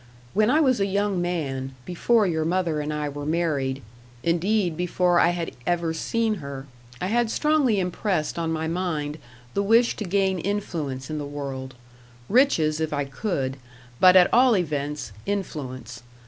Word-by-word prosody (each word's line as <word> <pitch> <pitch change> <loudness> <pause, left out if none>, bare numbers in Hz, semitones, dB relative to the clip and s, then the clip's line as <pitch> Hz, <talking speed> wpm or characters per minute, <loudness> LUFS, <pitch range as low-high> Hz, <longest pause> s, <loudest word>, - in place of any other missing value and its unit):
When 215 +2 +3
I 305 +5 +4
was 260 -6 +3
a 195 - +2
young 200 -1 0
man, 135 -7 -3
before 210 +5 +2
your 160 -4 0
mother 170 -2 0
and 150 0 -3
I 150 -1 -2
were 145 0 -6
married, 145 -4 -1 0.4
indeed 175 +1 +1
before 180 +1 +2
I - - +5
had 175 -1 -2 0.2
ever 170 -2 +1
seen 225 +6 0
her, 140 -1 -7 0.3
I - - -2
had 230 +4 +1
strongly 285 -5 +2
impressed 180 -3 -1
on 165 -1 -1
my 160 0 -2
mind 160 -4 -2 0.3
the 200 - +1
wish 230 +4 +4
to 215 - -3
gain 190 0 +1
influence 160 -9 -3
in 155 - -2
the 145 - -4
world 135 -2 -6 0.5
riches 165 - +3
if 160 -1 -1
I 145 -1 -1
could 135 -2 -3 0.4
but 185 0 +7
at 180 -1 +6
all 245 -2 +6
events, 150 - -3 0.2
influence. 130 - -4
170 Hz, 160 wpm, -25 LUFS, 145-200 Hz, 0.5 s, but